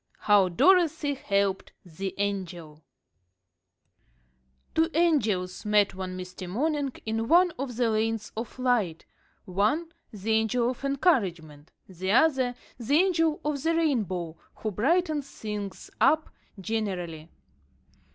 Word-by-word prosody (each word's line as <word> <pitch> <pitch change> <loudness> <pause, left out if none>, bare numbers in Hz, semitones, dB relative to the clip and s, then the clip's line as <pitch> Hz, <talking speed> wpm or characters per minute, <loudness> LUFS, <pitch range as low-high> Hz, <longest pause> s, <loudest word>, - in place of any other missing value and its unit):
"] - - -34
HOW 205 -3 +5
DOROTHY 320 - +3
HELPED 200 -7 -1
THE 185 +3 -6
ANGEL 175 -6 -4 1.9
Two 320 +1 +2
angels 215 - +1
met 210 -1 +3
one 185 -1 -5
misty 180 0 -7
morning 285 - -1
in 225 +1 -2
one 355 +4 +5
of 260 -3 -4
the 240 0 +1
Lanes 220 0 -1
of 225 +3 -6
Light: 235 -10 0 0.4
one, 245 - 0 0.2
the 215 +1 -4
Angel 220 +2 +2
of 255 - -10
Encouragement; 185 - 0 0.2
the 185 +1 -3
other, 260 -3 +3 0.2
the 245 +5 0
Angel 330 -3 +3
of 295 -2 -1
the 330 +3 +1
Rainbow, 195 - -1 0.2
who 215 - -4
brightens 300 - +1
things 210 -2 -6
up 315 0 +3 0.3
generally. 185 -6 -3
220 Hz, 120 wpm, -27 LUFS, 190-290 Hz, 1.9 s, HOW